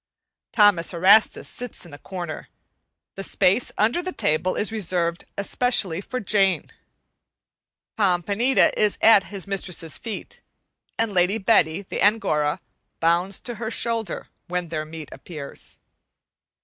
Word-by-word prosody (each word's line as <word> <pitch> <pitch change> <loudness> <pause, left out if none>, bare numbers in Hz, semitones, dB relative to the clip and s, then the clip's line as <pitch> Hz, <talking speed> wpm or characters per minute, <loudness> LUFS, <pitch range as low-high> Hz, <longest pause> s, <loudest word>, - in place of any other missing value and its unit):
Thomas 200 -5 +3
Erastus 195 +6 +4
sits 245 -6 -8
in 165 - -14
a 145 - -10
corner; 175 -5 -7 0.6
the 195 - -7
space 195 +5 +2
under 230 +11 +2
the 370 +1 -4
table 170 - 0
is 210 - 0
reserved 175 -5 -1
especially 200 -4 +1
for 255 +5 -5
Jane. 195 -3 +1 1.3
Pompanita 200 +6 +2
is 210 -1 +1
at 215 -3 +6
his 195 -2 -7
mistress's 180 -5 -3
feet, 225 -3 -7 0.6
and 225 -2 -1
Lady 185 +3 +2
Betty, 195 -4 +2
the - - -5
Angora, 155 -8 +2 0.4
bounds 175 +4 +2
to 240 - -3
her 220 - -2
shoulder 230 -4 -1 0.2
when 180 -1 -3
their 155 -1 -3
meat 155 -1 -9
appears. 150 -5 -10
195 Hz, 125 wpm, -23 LUFS, 170-220 Hz, 1.3 s, at